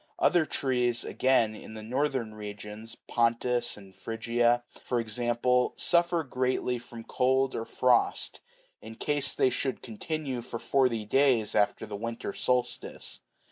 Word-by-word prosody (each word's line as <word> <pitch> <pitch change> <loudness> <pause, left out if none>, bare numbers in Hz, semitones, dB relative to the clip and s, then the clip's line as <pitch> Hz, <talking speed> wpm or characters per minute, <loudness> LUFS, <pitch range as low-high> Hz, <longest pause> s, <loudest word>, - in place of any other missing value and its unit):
Other 175 -3 +3
trees, 125 -3 0
again, 125 -4 +2
in 110 - -10
the 110 - -7
northern 130 -1 -1
regions, 105 +1 -8
Pontus 120 0 +1
and 95 -2 -14
Phrygia, 120 +3 +1 0.2
for 125 - 0
example, 120 +2 +1
suffer 170 -1 +2
greatly 125 -2 -1
from 115 -1 -10
cold 130 +2 +1
or 115 - -3
frost, 125 0 +1 0.4
in 110 0 -9
case 145 +1 0
they 130 - +3
should 130 0 -2
continue 130 +3 -4
for 115 - -6
forty 120 -3 +1
days 125 -2 +3
after 105 +1 +2
the 105 -1 -6
winter 115 +3 -4
solstice. 125 -1 -2
120 Hz, 135 wpm, -29 LUFS, 115-130 Hz, 0.4 s, Other